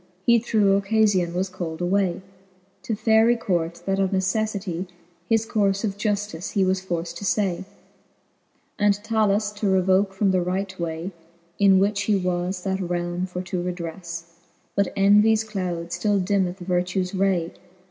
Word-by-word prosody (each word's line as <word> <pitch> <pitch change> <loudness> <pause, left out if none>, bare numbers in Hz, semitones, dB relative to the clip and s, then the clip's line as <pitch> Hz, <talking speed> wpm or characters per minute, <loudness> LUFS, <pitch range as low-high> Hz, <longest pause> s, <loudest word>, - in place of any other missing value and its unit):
He 235 -1 +5
through 210 -4 +3
occalion 200 -4 +2 0.2
called 170 -3 -5
was 175 - -1
away 190 -1 +1 0.6
To 225 - -2
Faery 220 +2 +4
court, 170 -6 -2
that 195 0 0
of 195 -1 +2
neceffity 190 -2 -1 0.4
His 225 -1 +2
courfe 200 -3 +1
of 200 -3 -1
juftice 205 -4 -2
he 195 -3 +3
was 185 0 +1
forft 175 -2 -4
to - - -8
ftay, 195 -2 0 1.1
And 205 -1 +4
'Talus 210 -1 +1
to 205 -1 -2
revoke 190 +1 +3
from 195 0 +2
the 185 -1 +2
right 190 +2 -3
way, 170 +2 -3 0.5
In 195 -2 +6
which 200 +1 +1
he 210 - +2
was 180 0 -1
that 190 -1 -1
realme 175 0 -2
for 180 0 -5
to 180 0 -3
redrefTe. 170 -1 -5 0.5
But 200 -1 +1
envies 210 +3 +5
cloud 180 -5 -4
ftill 205 -2 0
dimmeth 190 -2 0
vertues 180 0 -1
ray. 185 -3 0
190 Hz, 150 wpm, -24 LUFS, 180-205 Hz, 1.1 s, In